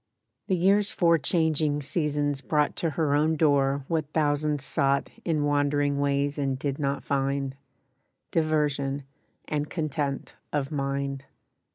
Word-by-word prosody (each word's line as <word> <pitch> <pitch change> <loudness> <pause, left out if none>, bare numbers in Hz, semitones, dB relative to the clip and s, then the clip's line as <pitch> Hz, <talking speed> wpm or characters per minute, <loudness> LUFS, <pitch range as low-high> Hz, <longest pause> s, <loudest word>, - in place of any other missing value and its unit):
The 190 - +2
year's 195 +3 +3
four 170 -2 +3
changing 155 -1 +1
seasons 145 -2 0
brought 150 +1 +1
To 165 - +1
her 155 -1 0
own 155 +2 +3
door 140 -3 +2
what 155 -3 -1
thousands 150 -2 +1
sought 140 +1 +1
In 155 -3 0
wandering 145 0 +1
ways 140 0 0
and 135 -2 0
did 140 +1 -3
not 140 -1 -1
find— 135 -1 -1 0.8
Diversion 145 -3 0 0.4
and 150 0 -2
content 145 -4 -3 0.2
of 145 -1 -1
mind. 140 -1 -2
145 Hz, 130 wpm, -27 LUFS, 140-155 Hz, 0.8 s, year's